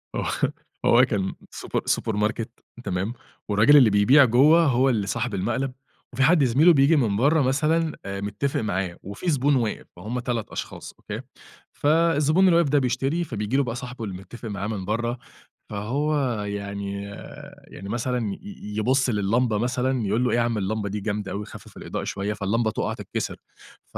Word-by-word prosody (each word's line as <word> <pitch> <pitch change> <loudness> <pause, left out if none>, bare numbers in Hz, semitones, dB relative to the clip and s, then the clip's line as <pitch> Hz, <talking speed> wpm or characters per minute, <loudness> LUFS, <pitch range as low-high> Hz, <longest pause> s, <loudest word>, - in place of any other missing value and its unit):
آه - - -2 0.6
هو 120 +2 +6
كان 100 -6 -2 0.2
super - - -2
supermarket 110 +1 0 0.4
تمام، 95 +4 -2 0.4
والراجل 110 +9 +6
اللي 125 -6 +7
بيبيع 115 +8 +6
جوه 145 +8 +5
هو 135 -1 +3
اللي 105 -5 0
صاحب 115 +3 -2
المقلب، 125 +7 -1 0.4
وفي 130 - +1
حد 155 +1 +5
زميل 135 +7 +3
له 175 - +9
بييجي 140 +3 +4
من 110 -8 +1
برّا 150 +6 +3
مثلًا 155 +4 +1
متفق 100 +7 -2
معاه، 95 -5 -2
وفي 100 - -4
زبون 145 -1 +2
واقف، 115 -4 -1
فهُم 110 +8 -4
3 120 -3 -3
أشخاص - - -7
أوكي، - - -6 0.5
فالزبون 160 +3 +3
اللي 180 - +5
واقف 170 -4 +3
ده 145 0 +4
بيشتري، 135 +6 0
فبييجي 105 -3 -2
له 140 - +3
بقى 120 -3 -4
صاحبه 125 -1 -7
اللي 95 -3 -5
متفق 115 +4 -9
معاه 100 0 -4
من 105 -4 -4
برّا، 115 +4 -1 0.5
فهو 135 +9 -1 0.3
يعني 100 -1 -4 0.7
يعني 100 +2 -9
مثلًا 120 -2 -1
ي - - -10 0.4
يبُص 130 +4 +2
للِّمبة 110 +2 +1
مثلًا 125 0 0
يقُول 110 +5 +1
له: 125 - +1
"إيه - - +2
يا - - +3
عم 115 -1 0
اللمبة 105 +1 -2
دي 105 +2 -3
جامدة 105 -1 -3
أوي، 105 +1 -4
خفف - - -13
الإضاءة - - -5
شوية"، 100 +1 -3
فاللمبة 110 +2 0
تقع - - -2
تتكسر، - - -4 0.6
ف - - -5
120 Hz, 175 wpm, -24 LUFS, 105-135 Hz, 0.7 s, له